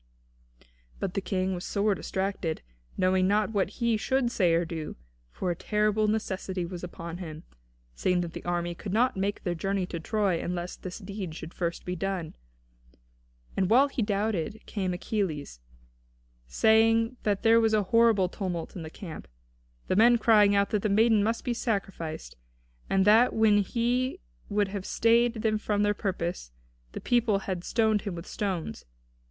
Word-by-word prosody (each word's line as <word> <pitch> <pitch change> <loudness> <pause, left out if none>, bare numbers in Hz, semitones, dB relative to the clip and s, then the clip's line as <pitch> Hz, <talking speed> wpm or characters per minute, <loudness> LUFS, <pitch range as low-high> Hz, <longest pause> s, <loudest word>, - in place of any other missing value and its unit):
But 190 -2 -3
the 195 - -1
King 190 0 -1
was 180 0 -5
sore 205 +1 +1
distracted, 190 -4 -3 0.3
knowing 185 0 +3
not 210 +2 +2
what 200 -3 +1
he 235 -2 +1
should 255 +2 0
say 175 -7 +3
or 170 +1 +1
do, 160 -2 -5 0.3
for 180 - -3
a - - -2
terrible 210 +3 +1
necessity 190 -4 -2
was 175 0 -7
upon 170 -1 -7
him, 160 -3 -7 0.5
seeing 180 - +1
that 170 -1 -5
the - - -7
army 175 0 -1
could 190 +3 -6
not 250 +4 +3
make 195 +1 -2
their 175 - -1
journey 195 +2 -1
to 175 -2 -5
Troy 195 -1 0
unless 175 0 -4
this 185 -1 -7
deed 195 -5 -6
should 160 +1 -8
first 170 -1 -3
be 180 - -3
done. 185 -2 -3 1.2
And 190 -1 +1
while 265 +5 +5
he 270 - -3
doubted 205 -1 -1
came 190 -3 -2
Achilles, 175 - -3 0.9
saying 225 - +3
that 205 -1 0
there 230 0 +6
was 220 -1 +3
a 210 - +2
horrible 225 -2 +4
tumult 175 -3 -4
in 180 - -5
the 160 - -6
camp, 160 - -9 0.6
the - - 0
men 235 +4 +6
crying 210 -3 +5
out 200 0 +2
that 210 - +1
the 215 - 0
maiden 215 +1 +4
must 225 +2 -1
be 245 - -1
sacrificed, 195 -9 -3 0.5
and 190 0 +3
that 225 +4 +6
when 220 -2 +4
he 245 - 0 0.3
would 205 -1 +1
have 195 -1 -4
stayed 235 +3 +3
them 215 -1 +1
from 210 -1 0
their 205 0 +3
purpose, 180 - -3 0.4
the - - -6
people 235 -4 +2
had 185 -3 -3
stoned 220 -1 +2
him 200 -4 -4
with 170 +1 -7
stones. 185 - -3
200 Hz, 170 wpm, -28 LUFS, 180-220 Hz, 1.2 s, there